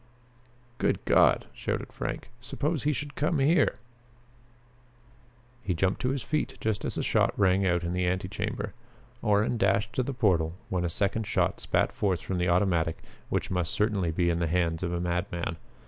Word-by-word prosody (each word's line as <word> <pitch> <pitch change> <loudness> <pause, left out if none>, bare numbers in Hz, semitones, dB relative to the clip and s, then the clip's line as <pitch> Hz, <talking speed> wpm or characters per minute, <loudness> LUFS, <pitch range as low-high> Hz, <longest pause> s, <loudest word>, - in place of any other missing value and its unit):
"Good - - 0
God!" - - +4
shouted - - -4
Frank. 125 - -5
"Suppose 150 +4 -2
he 150 - +1
should 145 +1 -4
come 155 +4 0
here?" 145 +2 +3 1.9
He 95 -5 -1
jumped 95 +3 0
to 125 - +1
his 135 -2 -2
feet 155 -1 -2
just 110 -2 -1
as - - -2
a - - 0
shot - - +2
rang 95 -1 +3
out 85 -1 +1
in 85 +1 -2
the 90 0 0
antechamber. 95 +2 -2 0.5
Orrin 105 +3 +2
dashed 100 +3 +2
to - - +1
the 130 - -2
portal 90 -9 +2
when 90 -2 0
a 85 - 0
second 100 +5 0
shot - - +1
spat - - +1
forth 95 -4 0
from 95 -2 -3
the 90 0 +1
automatic 85 -3 +1 0.3
which - - -1
must 90 -3 -1
certainly 105 -5 +1
be 85 +1 +1
in 85 - -1
the 85 - +1
hands 85 -1 0
of 90 -2 -1
a 85 - -1
madman. 85 -1 -2
95 Hz, 180 wpm, -28 LUFS, 85-110 Hz, 1.9 s, God